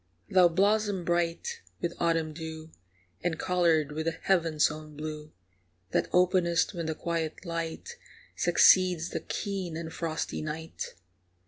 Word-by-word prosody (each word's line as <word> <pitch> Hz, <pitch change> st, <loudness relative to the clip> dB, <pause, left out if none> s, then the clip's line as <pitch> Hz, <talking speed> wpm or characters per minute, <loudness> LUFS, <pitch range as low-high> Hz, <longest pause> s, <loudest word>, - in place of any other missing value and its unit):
Thou 185 Hz, -2 st, +7 dB
blossom 200 Hz, +1 st, +1 dB
bright 175 Hz, -, -1 dB, 0.2 s
with 170 Hz, 0 st, -2 dB
autumn 165 Hz, -2 st, +1 dB
dew, 160 Hz, 0 st, -7 dB, 0.5 s
And 165 Hz, -2 st, 0 dB
coloured 165 Hz, -5 st, +2 dB
with 160 Hz, +2 st, -3 dB
the 165 Hz, -, +1 dB
heaven's 165 Hz, -6 st, +3 dB
own 155 Hz, -1 st, -9 dB
blue, 155 Hz, 0 st, -6 dB, 0.6 s
That -, -, +1 dB
openest 180 Hz, 0 st, +3 dB
when 170 Hz, -3 st, -4 dB
the 160 Hz, -, -2 dB
quiet 165 Hz, +1 st, -3 dB
light 170 Hz, -, -4 dB, 0.4 s
Succeeds 180 Hz, -3 st, +5 dB
the -, -, -2 dB
keen 190 Hz, -5 st, -4 dB
and 160 Hz, -1 st, -6 dB
frosty 160 Hz, -2 st, -3 dB
night. 155 Hz, +1 st, -5 dB
165 Hz, 130 wpm, -29 LUFS, 160-180 Hz, 0.6 s, Thou